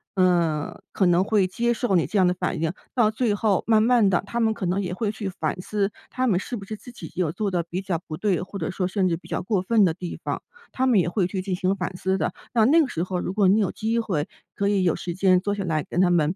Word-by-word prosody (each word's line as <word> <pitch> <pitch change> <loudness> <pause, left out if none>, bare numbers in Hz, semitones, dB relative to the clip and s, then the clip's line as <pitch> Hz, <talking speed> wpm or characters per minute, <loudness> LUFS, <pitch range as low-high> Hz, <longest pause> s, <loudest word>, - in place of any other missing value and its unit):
呃， 170 -5 +1
可 190 - +1
能 175 +1 +4
会 200 -2 +2
接 235 +6 0
受 230 -4 0
你 170 - +3
这 215 - -2
样 185 -2 +5
的 180 - +2
反 180 - -3
应， 160 -1 +1 0.2
到 235 -4 +3
最 220 -1 0
后 205 -2 +1
慢 220 -1 +5
慢 235 -3 +4
地 180 - +2
他 235 - -2
们 220 -1 +2
可 195 - -4
能 185 +3 0
也 180 -1 -3
会 215 +2 -1
去 205 -2 -4
反 185 - -3
思， 200 +1 -1 0.2
他 255 0 -1
们 195 -7 +3
是 240 +5 -5
不 200 - -8
是 215 - -5
自 245 +4 -12
己 170 -10 -9
有 170 -4 0
做 205 +2 -2
得 175 -2 0
比 185 +2 -3
较 180 -4 -2
不 155 - -5
对， 195 -4 0
或 195 +2 -7
者 - - -2
说 185 0 -2
甚 190 -1 +1
至 170 - +1
比 - - -16
较 - - -2
过 190 0 0
分 210 +2 +3
的 165 - +2
地 180 0 -7
方， - - -3 0.3
他 260 - 0
们 225 -6 +5
也 175 - +1
会 190 0 +1
去 185 0 -3
进 185 -1 -2
行 185 +1 +1
反 180 0 -4
思 190 +1 0
的。 180 - -1 0.2
那 225 -3 +4
那 320 +7 +6
个 285 - +1
时 170 -7 -2
候 185 0 -2
如 - - -3
果 200 -1 +3
你 200 +4 +4
有 195 - 0
机 225 +2 -1
会 180 -10 -1 0.3
可 200 - 0
以 200 -2 +2
有 175 - +2
时 175 -1 -5
间 185 -1 +4
坐 205 +2 -2
下 200 - -3
来 155 -4 -1
跟 175 - +1
他 185 - +4
们， 165 0 +2
190 Hz, 310 characters per minute, -24 LUFS, 180-215 Hz, 0.3 s, 那